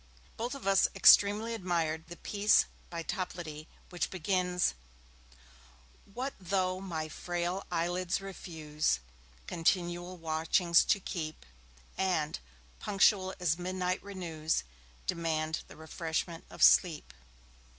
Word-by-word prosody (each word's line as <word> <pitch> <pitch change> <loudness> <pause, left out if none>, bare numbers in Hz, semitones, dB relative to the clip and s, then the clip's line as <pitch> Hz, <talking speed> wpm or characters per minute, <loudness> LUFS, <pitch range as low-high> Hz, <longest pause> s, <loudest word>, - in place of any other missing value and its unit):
Both 240 +4 -3
of 275 - -9
us 195 -1 +5
extremely 210 +3 +6
admired 165 -5 -1
the 175 - -8
piece 205 0 +3 0.2
by 170 -1 -5
Toplady 165 -5 -5 0.2
which 175 - -1
begins: 180 0 0 1.4
What 255 +6 -4
though 185 0 0
my 165 -5 -4
frail 175 +3 -3
eyelids 175 +2 0
refuse 155 - -2 0.5
Continual 175 +1 0
watchings 165 +2 +3
to 200 - +3
keep, 160 - -5 0.5
And, 175 -6 0 0.4
punctual 195 -1 +3
as 170 -1 +1
midnight 185 0 -1
renews, 165 -5 -2 0.4
Demand 160 - -1
the - - -13
refreshment 165 +1 -4
of - - -2
sleep. 155 - +5
175 Hz, 105 wpm, -31 LUFS, 160-190 Hz, 1.4 s, extremely